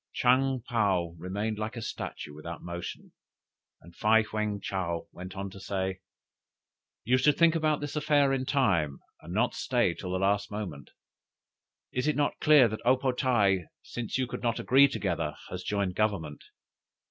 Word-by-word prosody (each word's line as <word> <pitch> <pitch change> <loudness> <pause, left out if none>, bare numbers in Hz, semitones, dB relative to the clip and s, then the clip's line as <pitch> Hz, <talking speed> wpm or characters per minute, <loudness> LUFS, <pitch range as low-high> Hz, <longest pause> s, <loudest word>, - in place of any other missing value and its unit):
'" - - -61
"Chang 130 +1 +3
paou 95 -7 +1
remained 105 +5 -3
like 110 +3 -4
a - - -4
statue 75 - -6
without 75 +2 -8
motion, 85 0 -7 0.7
and 85 +1 -16
Fei 110 +3 +4
heung 105 -1 -2
Chow 90 -4 -3
went 95 +2 -9
on 95 0 -5
to 95 - -11
say: 95 -1 -3 1.0
'You 125 +3 +3
should 140 +2 +3
think 170 -1 +5
about 155 -3 +1
this 145 0 -5
affair 145 -2 +3
in 130 -1 -1
time, 85 - +1 0.2
and 85 - -10
not 115 +6 +1
stay 120 -8 +1
till 90 +1 -6
the - - +1
last 100 +1 +1
moment. 95 -10 -6 1.0
Is 125 +3 -1
it 150 - +2
not 145 -1 0
clear 150 -5 +6
that 110 0 -5
O 125 +2 +4
po 130 0 0
tae, 105 - +2 0.2
since 120 0 -4
you 130 - +1
could 125 - -6
not 120 -1 0
agree 135 +2 +6
together, 85 - -2 0.2
has 90 - -4
joined 100 -2 -1
Government. 90 -8 -1
105 Hz, 170 wpm, -29 LUFS, 90-130 Hz, 1.0 s, clear